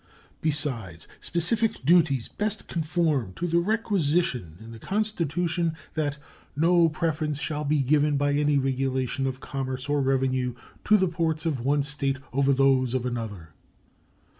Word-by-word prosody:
Besides, 125 Hz, -, -2 dB
specific 180 Hz, -, 0 dB
duties 155 Hz, -7 st, +4 dB
best 210 Hz, 0 st, -2 dB
conform 155 Hz, -, 0 dB
to 175 Hz, -, -4 dB
the 170 Hz, 0 st, +2 dB
requisition 170 Hz, -, 0 dB
in 115 Hz, +1 st, -11 dB
the 115 Hz, -, -10 dB
Constitution 175 Hz, -, -1 dB, 0.2 s
that 150 Hz, -2 st, -1 dB, 0.4 s
"no 170 Hz, +2 st, +4 dB
preference 155 Hz, -2 st, -2 dB
shall 150 Hz, 0 st, -3 dB
be 145 Hz, -1 st, +2 dB
given 145 Hz, +2 st, +2 dB
by 145 Hz, 0 st, +1 dB
any 145 Hz, 0 st, +2 dB
regulation 135 Hz, 0 st, -1 dB
of 130 Hz, 0 st, -4 dB
commerce 130 Hz, -1 st, -4 dB
or 145 Hz, 0 st, +1 dB
revenue 130 Hz, -2 st, 0 dB, 0.3 s
to 215 Hz, -, +6 dB
the 190 Hz, -2 st, +2 dB
ports 165 Hz, -2 st, -1 dB
of 155 Hz, -6 st, 0 dB
one 140 Hz, +4 st, +1 dB
State 140 Hz, -2 st, -1 dB, 0.2 s
over 140 Hz, +1 st, +3 dB
those 130 Hz, -2 st, +3 dB
of 125 Hz, -1 st, -1 dB
another." 110 Hz, -9 st, -5 dB
145 Hz, 140 wpm, -26 LUFS, 130-165 Hz, 0.4 s, to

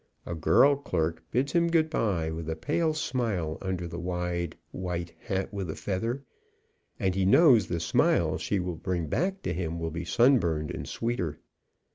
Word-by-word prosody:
A -, -, -4 dB
girl 120 Hz, -, +5 dB
clerk 80 Hz, -, -2 dB
bids 135 Hz, +4 st, 0 dB
him 170 Hz, -1 st, +3 dB
goodby 115 Hz, -, +1 dB
with 80 Hz, 0 st, -5 dB
a 80 Hz, -, -1 dB
pale 155 Hz, -, 0 dB
smile 110 Hz, -, -1 dB
under 95 Hz, -2 st, -3 dB
the 85 Hz, +1 st, -6 dB
wide 90 Hz, -1 st, -2 dB
white 90 Hz, -2 st, -4 dB
hat 95 Hz, +1 st, -3 dB
with 95 Hz, -4 st, -3 dB
a 80 Hz, -, -3 dB
feather, 115 Hz, +7 st, -2 dB, 0.8 s
and 95 Hz, -4 st, +1 dB
he 95 Hz, 0 st, 0 dB
knows 115 Hz, -, +6 dB
the 85 Hz, -, -2 dB
smile 80 Hz, -, +2 dB
she 100 Hz, -, -1 dB
brings 90 Hz, -2 st, -2 dB
back 190 Hz, -, -1 dB
to -, -, -1 dB
him 85 Hz, -1 st, -3 dB
will 80 Hz, -1 st, -3 dB
be 85 Hz, +2 st, -4 dB
sunburned 85 Hz, -, +3 dB
and -, -, -6 dB
sweeter. 90 Hz, -10 st, -2 dB
90 Hz, 165 wpm, -28 LUFS, 85-120 Hz, 0.8 s, knows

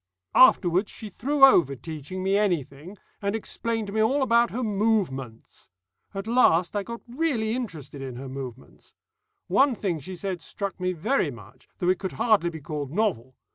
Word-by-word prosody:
"Afterwards 185 Hz, -5 st, +5 dB
she 215 Hz, -, -8 dB
threw 280 Hz, +7 st, -1 dB
over 165 Hz, -, +4 dB
teaching 160 Hz, +5 st, -7 dB
me 195 Hz, +1 st, +2 dB
anything, 175 Hz, -3 st, -1 dB, 0.2 s
and 200 Hz, +1 st, -1 dB
explained 225 Hz, 0 st, -3 dB
to 200 Hz, -, -7 dB
me 220 Hz, -, +1 dB
all 265 Hz, +6 st, +2 dB
about 235 Hz, -1 st, +3 dB
her 250 Hz, +2 st, -3 dB
Movements. 195 Hz, -, -2 dB, 0.5 s
At 195 Hz, +1 st, -4 dB
least, 210 Hz, -7 st, +3 dB
I 205 Hz, -, +1 dB
got 235 Hz, +3 st, -7 dB
really 240 Hz, -5 st, -1 dB
interested 160 Hz, -, -6 dB
in 130 Hz, -2 st, -6 dB
her 135 Hz, +2 st, -7 dB
Movements. 130 Hz, -2 st, -9 dB, 0.5 s
One 270 Hz, -2 st, +3 dB
thing 180 Hz, -7 st, -2 dB
she 185 Hz, +6 st, -8 dB
said 180 Hz, 0 st, -4 dB
struck 200 Hz, +2 st, -5 dB
me 185 Hz, 0 st, 0 dB
very 180 Hz, -, 0 dB
much, 110 Hz, -5 st, -13 dB
though 180 Hz, -, 0 dB
it 185 Hz, -1 st, +2 dB
could 190 Hz, -, -4 dB
hardly 210 Hz, -7 st, +2 dB
be 160 Hz, -2 st, -9 dB
called 145 Hz, -2 st, -5 dB
novel. 155 Hz, -, -1 dB
190 Hz, 175 wpm, -26 LUFS, 150-225 Hz, 0.5 s, Afterwards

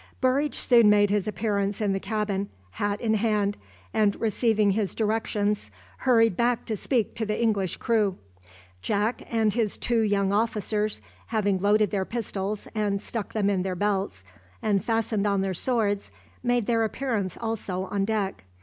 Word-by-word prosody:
Burridge 270 Hz, +3 st, +1 dB
soon 235 Hz, -4 st, +5 dB
made 205 Hz, -1 st, +4 dB
his 205 Hz, 0 st, +1 dB
appearance 200 Hz, 0 st, -1 dB
in 205 Hz, -3 st, +1 dB
the 195 Hz, -, -1 dB
cabin, 200 Hz, -1 st, -2 dB, 0.2 s
hat 205 Hz, -, -2 dB
in 220 Hz, -2 st, +1 dB
hand, 210 Hz, -2 st, +1 dB, 0.4 s
and 210 Hz, -2 st, +2 dB
receiving 220 Hz, -1 st, +2 dB
his 200 Hz, -1 st, -1 dB
directions 210 Hz, -1 st, 0 dB, 0.3 s
hurried 225 Hz, -6 st, +4 dB
back 240 Hz, +2 st, +1 dB
to 220 Hz, -, -2 dB
speak 230 Hz, +1 st, 0 dB
to 230 Hz, -, -3 dB
the 215 Hz, 0 st, -2 dB
English 205 Hz, -6 st, 0 dB
crew. 215 Hz, -5 st, +1 dB, 0.6 s
Jack 215 Hz, +3 st, 0 dB
and 220 Hz, -3 st, +2 dB
his 225 Hz, -4 st, 0 dB
two 235 Hz, -1 st, +1 dB
young 200 Hz, -2 st, +2 dB
officers, 215 Hz, -1 st, 0 dB, 0.3 s
having 205 Hz, -4 st, +1 dB
loaded 205 Hz, +1 st, +3 dB
their 195 Hz, -2 st, 0 dB
pistols 205 Hz, -2 st, -4 dB
and 205 Hz, -2 st, 0 dB
stuck 220 Hz, +1 st, -5 dB
them 210 Hz, -2 st, +1 dB
in 195 Hz, -2 st, +1 dB
their 185 Hz, 0 st, -2 dB
belts, 195 Hz, -, -1 dB, 0.4 s
and 200 Hz, -3 st, +1 dB
fastened 225 Hz, -2 st, 0 dB
on 200 Hz, -1 st, +1 dB
their 190 Hz, -1 st, -1 dB
swords, 205 Hz, -1 st, 0 dB, 0.3 s
made 245 Hz, -2 st, +1 dB
their 230 Hz, 0 st, +2 dB
appearance 220 Hz, -5 st, -2 dB
also 215 Hz, -5 st, -3 dB
on 195 Hz, +1 st, -1 dB
deck. 195 Hz, -, -1 dB
210 Hz, 160 wpm, -26 LUFS, 200-225 Hz, 0.6 s, soon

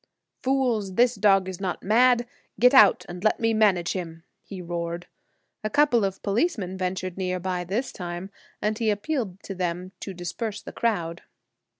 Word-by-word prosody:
"Fools, 245 Hz, -8 st, 0 dB
this 245 Hz, +2 st, +4 dB
dog 195 Hz, -3 st, +3 dB
is 190 Hz, 0 st, -6 dB
not 185 Hz, -3 st, -3 dB
mad; 240 Hz, +3 st, +4 dB, 0.3 s
get 250 Hz, +4 st, +6 dB
out 210 Hz, -7 st, +7 dB
and 175 Hz, +1 st, -8 dB
let 215 Hz, -, +2 dB
me 225 Hz, 0 st, +2 dB
manage 200 Hz, -6 st, +3 dB
him," 165 Hz, -3 st, -6 dB, 0.2 s
he 195 Hz, -, -9 dB
roared. 170 Hz, 0 st, -4 dB, 0.6 s
A 215 Hz, -, -1 dB
couple 265 Hz, -3 st, +3 dB
of 195 Hz, -1 st, -2 dB
police 235 Hz, -, +1 dB
ventured 185 Hz, -1 st, -4 dB
near 185 Hz, -1 st, -1 dB
by 180 Hz, 0 st, -2 dB
this 205 Hz, +9 st, -2 dB
time, 175 Hz, +1 st, -6 dB, 0.3 s
and 215 Hz, +2 st, 0 dB
he 225 Hz, -2 st, +1 dB
appealed 205 Hz, -, -2 dB
to 195 Hz, -, -6 dB
them 180 Hz, 0 st, -3 dB
to 195 Hz, -, -6 dB
disperse 200 Hz, +5 st, -4 dB
the -, -, -9 dB
crowd. 175 Hz, -8 st, -1 dB
195 Hz, 170 wpm, -25 LUFS, 180-225 Hz, 0.6 s, out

